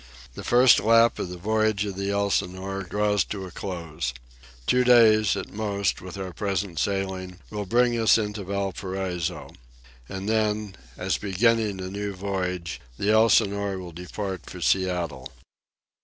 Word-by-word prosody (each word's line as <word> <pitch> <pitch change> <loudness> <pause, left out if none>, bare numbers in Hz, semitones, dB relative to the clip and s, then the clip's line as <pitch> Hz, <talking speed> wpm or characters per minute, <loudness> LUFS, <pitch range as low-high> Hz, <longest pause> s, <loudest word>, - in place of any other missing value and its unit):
The - - -8
first 125 +1 +6
lap 115 +1 +4
of - - -3
the 90 - -7
voyage 110 +1 +1
of 100 -2 -4
the 100 +1 -2
Elsinore 95 -1 -1
draws 105 +1 +1
to 95 -2 -5
a 90 - -9
close. 85 -9 -4 0.5
Two 125 - +3
days, 110 -4 +6
at 95 - -6
most, 100 -2 -1
with 95 +1 -8
our 95 -2 -5
present 100 -4 -2
sailing, 95 -2 -2
will 105 -2 -4
bring 120 +3 +3
us 110 0 +5
into 105 -2 -3
Valparaiso. 95 -2 -3 0.6
And 95 +1 -5
then, 105 -2 0 0.2
as - - -1
beginning 105 0 +1
a 95 0 -5
new 100 0 -4
voyage, 90 -6 -3 0.2
the 105 - +1
Elsinore 100 -3 +3
will 90 -2 -7
depart 95 +3 -6
for 90 - -8
Seattle. 90 0 0
100 Hz, 145 wpm, -25 LUFS, 95-105 Hz, 0.6 s, first